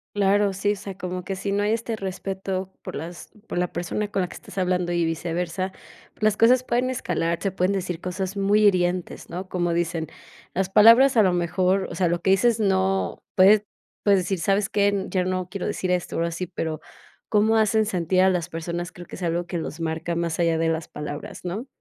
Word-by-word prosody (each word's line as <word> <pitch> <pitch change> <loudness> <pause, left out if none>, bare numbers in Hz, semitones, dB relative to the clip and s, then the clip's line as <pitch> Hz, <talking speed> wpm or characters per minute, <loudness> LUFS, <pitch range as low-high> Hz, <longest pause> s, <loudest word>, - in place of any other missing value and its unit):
Claro, 200 0 +3
sí, 205 +2 0
o - - -5
sea, 195 -1 -8
como 180 0 -4
que 195 +2 -4
si 200 +1 -3
no 200 +1 +1
hay 210 +1 +1
este 230 0 -1
respeto 190 -1 -4
por - - -7
las 170 +4 -7 0.2
por 175 - -2
la 180 - -1
persona 175 +5 -2
con 200 -2 -1
la 180 - -2
que - - -11
estás - - -12
hablando 180 -1 0
y 170 -1 +1
viceversa, 175 +3 -2 0.4
pues - - -10
las 215 -1 +4
cosas 245 +4 +5
pueden 250 +1 0
escalar, 170 -8 -1
se 195 - -1
pueden 185 +1 +1
decir 180 -3 -3
cosas 185 +1 -3
muy 205 +2 +3
hirientes, 180 -2 +1
¿no? 185 +2 -5
Como 175 -2 -1
dicen: 170 -1 -1 0.5
"Las 190 0 0
palabras 235 +6 +7
a 220 - +6
lo 185 -3 +4
mejor", 180 +2 +1
o - - -6
sea, 185 - +2
lo 175 0 -1
que 190 - +3
dices 225 +3 +3
no 190 -1 +1
puedes 200 +3 +6 0.4
puedes 200 -2 +4
decir: 180 0 -2
"¿Sabes 195 +2 +1
qué?, 200 -1 +1
ya 185 -1 +1
no 185 -1 -1
quiero 195 +1 -4
decir 185 - -2
esto", 180 -1 -1
o, - - -1
algo 170 0 +1
así, 175 +2 -4
pero, 160 -3 -4 0.5
cómo 220 +1 +3
hacen 220 0 +3
sentir 185 -2 +1
a 190 - +5
las 175 -1 -2
personas, 170 +2 -4
creo 175 - -11
que - - -10
es - - -10
algo 170 0 -1
que 175 -1 -3
los 160 0 -6
marca 165 +1 -2
más 170 -1 -2
allá 165 -1 +2
de 165 0 +1
las 160 -1 -2
palabras, 150 +3 -7
¿no? 205 +9 -4
185 Hz, 225 wpm, -24 LUFS, 175-200 Hz, 0.5 s, palabras